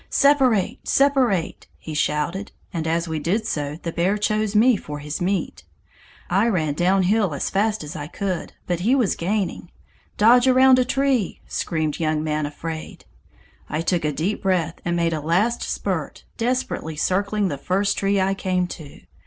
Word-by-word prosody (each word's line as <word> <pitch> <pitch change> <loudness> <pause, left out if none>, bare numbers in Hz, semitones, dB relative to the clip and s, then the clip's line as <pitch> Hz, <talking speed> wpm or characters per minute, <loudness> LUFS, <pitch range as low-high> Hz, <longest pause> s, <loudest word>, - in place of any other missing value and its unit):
'Separate! 265 -8 +3
separate!' 260 -11 +1
he 160 - -8
shouted, 150 +6 -1 0.2
and 165 -2 -2
as 165 +1 0
we 160 -1 -2
did 200 +9 -1
so, 150 -6 -3
the 165 - -3
bear 185 +5 +1
chose 215 0 0
me 235 +3 +5
for 150 -6 -6
his 150 +3 -5
meat. 175 - -2 0.6
I 195 +6 +2
ran 160 -9 0
downhill 185 +2 +2
as - - -2
fast 210 -1 0
as 150 - -8
I 145 -1 -5
could, 185 +1 -4
but 175 -2 -1
he 230 +9 +2
was 245 -8 +1
gaining. 190 -1 -2 0.5
'Dodge 245 +4 +6
around 260 0 +6
a 250 - +3
tree!' 265 -5 0
screamed 155 -2 -2
Young 155 -1 0
Man 155 -1 -1
Afraid. 160 +2 -7 0.6
I 155 +2 -1
took 170 0 0
a 150 - +1
deep 160 +9 -2
breath 180 -4 0
and 175 0 -1
made 170 -1 +1
a 155 - -2
last 190 +10 +1
spurt, - - -3
desperately 235 -9 -2
circling 200 +5 0
the 140 - -4
first 195 +5 0
tree 200 0 +1
I 190 +1 +2
came 185 -2 0
to. 150 -5 -10
185 Hz, 170 wpm, -22 LUFS, 160-215 Hz, 0.6 s, Dodge